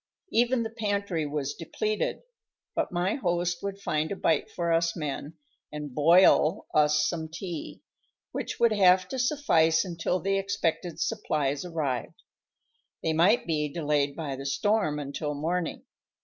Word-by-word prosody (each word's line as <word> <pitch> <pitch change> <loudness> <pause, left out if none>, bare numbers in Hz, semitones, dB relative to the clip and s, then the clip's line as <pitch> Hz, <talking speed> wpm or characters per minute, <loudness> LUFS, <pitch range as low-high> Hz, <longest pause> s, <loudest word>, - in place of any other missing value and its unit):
Even 240 +1 +2
the 225 - -5
pantry 200 -7 -1
was 145 -1 -2
depleted, 210 +6 -2 0.5
but - - -1
my 180 +3 0
host 175 -6 -1
would 200 0 -4
find 155 -4 -1
a - - -1
bite 165 - +1
for 170 -1 -2
us 165 0 +1
men, 150 +1 -5 0.3
and 150 -3 -6
"boil" 165 +3 +5
us 150 0 +4
some 160 -2 -3
tea, 170 -1 -6 0.5
which - - -4
would 235 -1 +4
have 185 -2 +5
to 265 - -4
suffice 200 - +3
until 175 +1 -1
the 195 +1 0
expected 180 -4 -2
supplies 150 -10 -1
arrived. 150 -9 -3 0.8
They 160 - +1
might 180 +9 +4
be 150 -3 0
delayed 145 -3 0
by 150 -5 -4
the 135 +1 -6
storm 200 0 +1
until 145 +1 -4
morning. 165 +3 -2
165 Hz, 145 wpm, -27 LUFS, 150-195 Hz, 0.8 s, boil